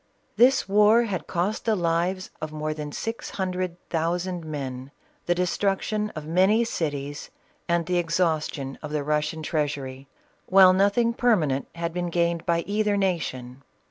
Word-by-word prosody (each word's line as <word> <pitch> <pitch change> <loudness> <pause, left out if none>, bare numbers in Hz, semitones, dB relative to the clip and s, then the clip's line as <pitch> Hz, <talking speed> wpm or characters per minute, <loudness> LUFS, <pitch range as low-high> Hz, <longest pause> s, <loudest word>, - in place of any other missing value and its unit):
This 255 0 +4
war 210 +4 +5
had 200 -6 -4
cost 185 +5 -1
the 220 -2 +2
lives 175 +1 -1
of 155 -1 -4
more 155 0 -3
than 150 -1 -6
six 225 +9 -4
hundred 185 -2 -3
thousand 175 +2 -1
men, 135 -4 -5 0.4
the 175 - +3
destruction 195 +3 0
of 155 -1 -6
many 190 +8 +3
cities, 145 -8 -3 0.4
and 170 -1 +2
the 180 +1 +1
exhaustion 160 -5 -1
of 150 - -7
the 150 -1 -1
Russian 150 +2 -1
treasury, 140 -3 -3 0.4
while 185 -1 +7
nothing 205 +5 +3
per 240 -1 +3
manent 140 -7 -1
had 170 0 -3
been 175 0 -2
gained 170 -1 0
by 170 0 +2
either 205 +2 0
nation. 135 -10 -2
170 Hz, 150 wpm, -25 LUFS, 150-195 Hz, 0.4 s, while